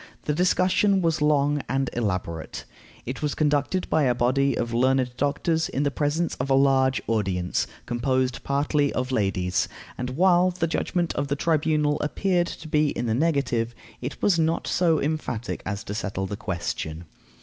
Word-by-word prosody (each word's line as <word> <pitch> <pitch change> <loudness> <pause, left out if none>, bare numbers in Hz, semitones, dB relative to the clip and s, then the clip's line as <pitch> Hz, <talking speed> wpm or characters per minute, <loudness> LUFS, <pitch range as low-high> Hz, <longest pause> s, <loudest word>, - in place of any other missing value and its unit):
The 150 - 0
discussion 185 +3 +2
was 165 -2 +1
long 145 -1 +2
and 135 0 0
elaborate. 90 -8 -3 0.4
It 130 +5 -5
was 150 -1 -1
conducted 150 +4 +1
by 155 -3 +2
a 125 -1 +2
body 135 +3 +2
of 115 0 -2
learned 130 0 +2
doctors, 155 +4 0
in 140 - -1
presence 150 +4 0
of 130 +2 -3
a 135 - +4
large 135 -1 +3
audience, 95 -5 0 0.2
composed 130 +1 0
partly 145 +1 +1
of 125 +1 -2
ladies; 95 -5 0 0.3
and 125 0 -2
while 180 +5 +4
the 180 -2 -1
judgment 170 +1 -1
of 145 - -2
the 140 - 0
tribunal 150 -1 +1
appeared 175 +3 +1
to 165 - -8
be 150 -1 +2
in 120 - -3
the 110 - 0
negative, 125 -5 0 0.3
it 125 +3 -6
was 185 -5 +3
not 160 +1 +1
so 165 -3 +2
emphatic 140 -6 -3
as 100 +1 -3
to 105 - -5
settle 95 -1 -3
the 100 - -4
question. 85 -4 -4
140 Hz, 165 wpm, -25 LUFS, 120-160 Hz, 0.4 s, a